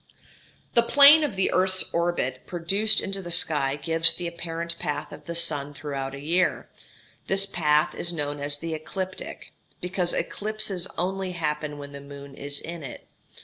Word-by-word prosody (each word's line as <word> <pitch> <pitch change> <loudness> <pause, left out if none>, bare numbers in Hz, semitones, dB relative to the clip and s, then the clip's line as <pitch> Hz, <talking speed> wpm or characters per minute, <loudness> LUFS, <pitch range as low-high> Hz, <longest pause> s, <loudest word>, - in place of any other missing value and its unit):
The 235 - +6
plane 285 +6 +7
of 285 -9 -2
the 190 - +1
earth's 185 0 +3
orbit 170 -7 -2
produced 195 +5 +3
into 195 0 -3
the 175 - -8
sky 145 -5 +3
gives 165 +2 +6
the 175 - -6
apparent 170 0 -5
path 150 -4 -4
of - - -12
the 170 - -6
sun 145 -4 +2
throughout 135 -2 -5
a - - -9
year. 170 +6 0 0.6
This 195 +1 +2
path 150 -5 +1
is 175 - -1
known 145 -3 -4
as 145 0 -1
the 165 +2 -5
ecliptic, 185 +4 -7 0.3
because 180 -1 -2
eclipses 210 -4 -2
only 190 0 -3
happen 150 -3 -3
when 140 0 -9
the 140 0 -10
moon 140 0 -11
is 140 +1 -4
in 170 0 -8
it. 135 -4 -10
170 Hz, 165 wpm, -25 LUFS, 145-185 Hz, 0.6 s, plane